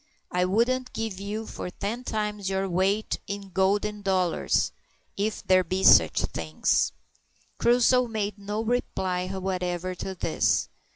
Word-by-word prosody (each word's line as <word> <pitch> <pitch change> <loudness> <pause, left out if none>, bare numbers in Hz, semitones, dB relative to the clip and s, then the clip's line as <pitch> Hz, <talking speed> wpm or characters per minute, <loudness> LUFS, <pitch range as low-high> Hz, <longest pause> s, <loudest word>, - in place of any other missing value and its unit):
"I 180 0 +2
wouldn't 250 +6 +1
give 220 -4 -3
you 210 +3 -4
for 180 - -6
ten 210 +7 -4
times 210 -4 -2
your 195 0 0
weight 190 +4 0
in 200 -1 -6
golden 205 +3 +1
dollars 185 -3 +1 0.4
if 210 +2 -2
there 185 0 +4
be 185 +2 -2
sich - - +6
things." 80 -1 0 0.7
Crusoe 245 +1 +4
made 210 -2 -3
no 205 +2 -3
reply 190 -6 -1
whatever 185 -1 -2
to 190 +1 -5
this. 165 - +1
200 Hz, 130 wpm, -26 LUFS, 185-215 Hz, 0.7 s, sich